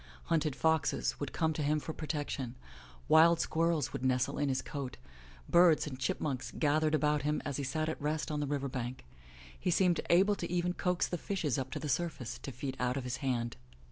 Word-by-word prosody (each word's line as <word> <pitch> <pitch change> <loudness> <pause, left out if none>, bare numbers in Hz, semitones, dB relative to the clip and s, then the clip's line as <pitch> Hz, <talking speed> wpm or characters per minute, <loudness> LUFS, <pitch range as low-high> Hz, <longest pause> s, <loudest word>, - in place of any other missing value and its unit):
Hunted 155 -4 +1
foxes 160 -1 +1
would 145 -2 -3
come 160 -1 +1
to 155 - -3
him 150 +1 +2
for 160 - -5
protection; 145 -5 -3 0.5
wild 165 +1 +6
squirrels 165 -4 +1
would - - -4
nestle 130 +1 +1
in 145 -1 +1
his 130 -1 0
coat; 140 -4 -5 0.5
birds 170 -2 +5
and 130 -4 -6
chipmunks 130 0 -2
gathered 155 +1 +2
about 150 0 +2
him 150 +2 0
as 140 -2 -2
he 140 - -2
sat 155 +4 -1
at 160 - -3
rest 150 +1 -1
on 150 - -1
the 145 - -1
river 140 -1 -1
bank; 125 - -5 0.5
he - - -1
seemed 175 0 +3
able 195 +4 +5
even 175 +1 0
to - - -23
coax 180 -2 +1
the 175 - -3
fishes 155 - -1
up 130 0 -3
to - - -4
the 150 - -4
surface 145 -4 -2
to 135 - -6
feed 130 +2 -5
out 125 +1 0
of 135 - -3
his 125 0 -3
hand. 120 -4 -2
150 Hz, 205 wpm, -32 LUFS, 130-160 Hz, 0.5 s, wild